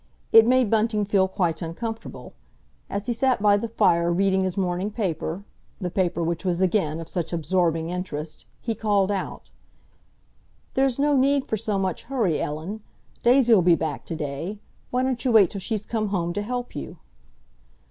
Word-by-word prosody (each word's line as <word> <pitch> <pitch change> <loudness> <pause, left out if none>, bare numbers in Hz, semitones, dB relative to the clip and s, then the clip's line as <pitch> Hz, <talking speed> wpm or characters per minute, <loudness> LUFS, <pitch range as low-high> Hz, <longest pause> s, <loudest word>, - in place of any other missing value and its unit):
It 225 0 +8
made 255 -3 +3
Bunting 215 -1 +2
feel 195 -2 +3
quite 185 -4 -1
uncomfortable. 225 +7 -6 0.6
As 200 +1 -3
he 240 - 0
sat 255 +1 +1
by 205 0 +5
the 205 +3 -1
fire 170 -6 +2
reading 190 +2 +2
his 185 0 -2
morning 185 +1 -1
paper—the 185 -1 -5
paper 175 -2 0
which 165 0 -2
was 180 -2 0
again 180 -4 +1
of 165 - -7
such 170 -2 -3
absorbing 165 -1 0
interest—he 180 +5 -5
called 205 -3 +1
out, 195 -2 -5 1.2
"There's 265 -2 +2
no 290 +1 +2
need 275 +1 +3
for - - -1
so 215 -1 -1
much 190 -2 -2
hurry, 225 - 0
Ellen. 160 +9 -4 0.4
Daisy'll 240 -4 +5
be 175 -1 +5
back 160 -2 -3
to 165 - -3
day. 155 +6 -4 0.3
Why 250 +1 0
don't 255 -3 -1
you 255 - +1
wait 205 -6 +6
till 200 - -6
she's 215 +1 -3
come 220 -2 -1
home 175 -4 -1
to 205 - -2
help 245 +3 -4
you?" - - -6
195 Hz, 170 wpm, -24 LUFS, 170-225 Hz, 1.2 s, It